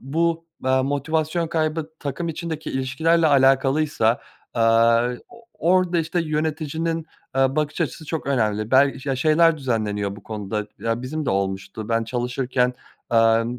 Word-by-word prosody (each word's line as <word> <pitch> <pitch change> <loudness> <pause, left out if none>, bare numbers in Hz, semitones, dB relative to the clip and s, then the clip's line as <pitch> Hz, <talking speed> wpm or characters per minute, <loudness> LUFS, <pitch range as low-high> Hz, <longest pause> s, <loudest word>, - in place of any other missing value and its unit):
bu, 165 +4 -1 0.2
aaa, 130 0 +3
motivasyon 155 +4 -1
kaybı 160 -1 -1
takım 145 +4 -4
içindeki 160 -1 -4
ilişkilerle 160 +6 +1
alakalıysa, 135 -3 +3 0.3
aaa, 115 +1 +4 0.2
o 235 -1 -16
orada, 180 0 +2
işte, 165 +2 -1
yöneticinin, 160 +1 -2 0.3
aaa, 135 +1 +2
bakış 150 +2 -1
açısı 155 +1 -2
çok 160 -2 -4
önemli. 110 -5 0
Bel 135 +1 +5
ya, 135 -2 -1
şeyler 160 +3 +4
düzenleniyor 105 -6 -2
bu 100 - -13
konuda 105 -1 -4
ya, 115 +1 -2
bizim 150 +3 -4
de - - +2
olmuştu. 95 +2 -3
Ben 115 0 +1
çalışırken, 125 +1 -1 0.4
amm, 115 +1 +3
135 Hz, 135 wpm, -23 LUFS, 115-160 Hz, 0.4 s, Bel